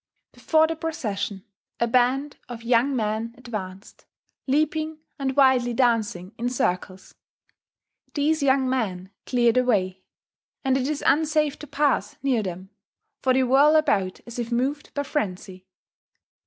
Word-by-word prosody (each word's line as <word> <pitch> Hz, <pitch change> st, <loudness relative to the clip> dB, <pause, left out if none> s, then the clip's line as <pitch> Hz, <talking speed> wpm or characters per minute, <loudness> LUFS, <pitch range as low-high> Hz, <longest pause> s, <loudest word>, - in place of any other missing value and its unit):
Before 315 Hz, -1 st, +3 dB
the 325 Hz, +1 st, -2 dB
procession 215 Hz, -, -4 dB, 0.4 s
a 235 Hz, -, +3 dB
band 255 Hz, +4 st, +1 dB
of 235 Hz, -1 st, -8 dB
young 245 Hz, +3 st, +2 dB
men 220 Hz, 0 st, -2 dB
advance, 210 Hz, -6 st, -7 dB, 0.5 s
leaping 310 Hz, +3 st, 0 dB, 0.2 s
and 265 Hz, -1 st, -1 dB
wildly 260 Hz, -4 st, +4 dB
dancing 225 Hz, -6 st, 0 dB
in 240 Hz, +1 st, 0 dB
circles: 185 Hz, -5 st, -2 dB, 1.0 s
these 305 Hz, +1 st, +1 dB
young 265 Hz, -1 st, +3 dB
men 195 Hz, -8 st, -2 dB, 0.2 s
clear 240 Hz, -2 st, +3 dB
the 255 Hz, +2 st, +2 dB
way; 190 Hz, -6 st, 0 dB, 0.6 s
and 265 Hz, -1 st, +3 dB
it 265 Hz, 0 st, 0 dB
is 300 Hz, -1 st, -3 dB
unsafe 305 Hz, -1 st, +2 dB
to 300 Hz, -, -9 dB
pass 285 Hz, 0 st, 0 dB
near 260 Hz, -5 st, +2 dB
them, 185 Hz, 0 st, -6 dB, 0.5 s
for 260 Hz, -, +2 dB
they 260 Hz, -, +3 dB
whirl 275 Hz, +5 st, +5 dB
about 195 Hz, -12 st, +1 dB
as 235 Hz, 0 st, -8 dB
if 235 Hz, 0 st, -4 dB
moved 270 Hz, +5 st, -1 dB
by 285 Hz, -, 0 dB
frenzy 190 Hz, -9 st, -4 dB
250 Hz, 140 wpm, -24 LUFS, 215-285 Hz, 1.0 s, whirl